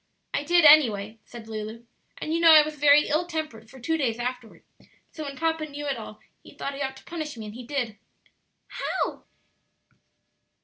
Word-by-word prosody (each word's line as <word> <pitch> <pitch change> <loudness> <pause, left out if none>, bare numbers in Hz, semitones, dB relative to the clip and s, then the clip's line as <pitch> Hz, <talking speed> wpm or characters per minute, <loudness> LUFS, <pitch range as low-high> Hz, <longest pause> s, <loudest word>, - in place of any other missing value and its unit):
"I - - 0
did, 345 +1 +4
anyway," 225 -8 +5
said 235 -2 -11
Lulu; 220 +1 -7 0.3
"and 310 - -4
you 335 - +1
know 335 -1 +7
I 305 -1 +9
was 305 +1 -5
very 295 0 +5
ill 315 +4 0
tempered 305 -10 -5
for 265 - -14
two 320 +7 -1
days 240 -7 -1
afterward; 245 -1 -6 0.5
so 310 - -7
when 280 -1 -7
papa 320 0 -1
knew 290 0 -7
it 280 -2 -1
all 215 -1 -9 0.2
he - - -16
thought 280 - -4
he 275 - -7
ought 265 -1 -3
to - - -15
punish 310 -6 -6
me, 220 - -7
and 210 - -8
he 240 +1 -10
did." 245 -7 -3 0.7
"How?" - - -3
280 Hz, 190 wpm, -26 LUFS, 230-310 Hz, 0.7 s, I